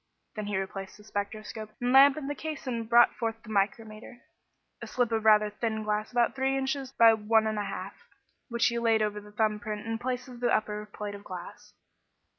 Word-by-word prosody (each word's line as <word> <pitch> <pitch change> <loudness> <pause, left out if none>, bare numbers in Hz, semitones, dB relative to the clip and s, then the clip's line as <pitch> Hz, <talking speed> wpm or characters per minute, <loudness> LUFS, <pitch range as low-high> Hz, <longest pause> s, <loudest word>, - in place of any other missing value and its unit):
Then 215 -1 -4
he 205 -2 -1
replaced 195 0 -5
the 210 - -16
spectroscope 215 +1 -5
and 245 0 0
lamp 275 +1 +8
in 300 - -5
the 290 - -2
case 310 -1 -6
and 230 -3 -3
brought 240 0 +6
forth 225 -1 -2
the 220 - -13
micrometer 215 +4 -2 0.6
a - - -6
slip 245 -2 0
of 220 -1 -1
rather 210 -1 +5
thin 220 0 -2
glass 210 0 -2
about 240 -1 +2
three 270 0 +1
inches 270 0 -2
by 230 -4 +6
one 220 0 +2
and 215 -1 -1
a 205 - -2
half - - -5 0.6
which 235 0 +1
he 235 -1 +1
laid 225 -2 +3
over 210 0 -2
the 210 0 -14
thumb 215 0 0
print 215 -2 -5
in 225 - -4
the 225 - -1
place 250 0 -3
of 245 -2 -11
the 245 - +1
upper 210 -1 -1
plate 210 -1 -6
of 200 0 -10
glass. 180 -3 -10
220 Hz, 220 wpm, -29 LUFS, 210-240 Hz, 0.6 s, lamp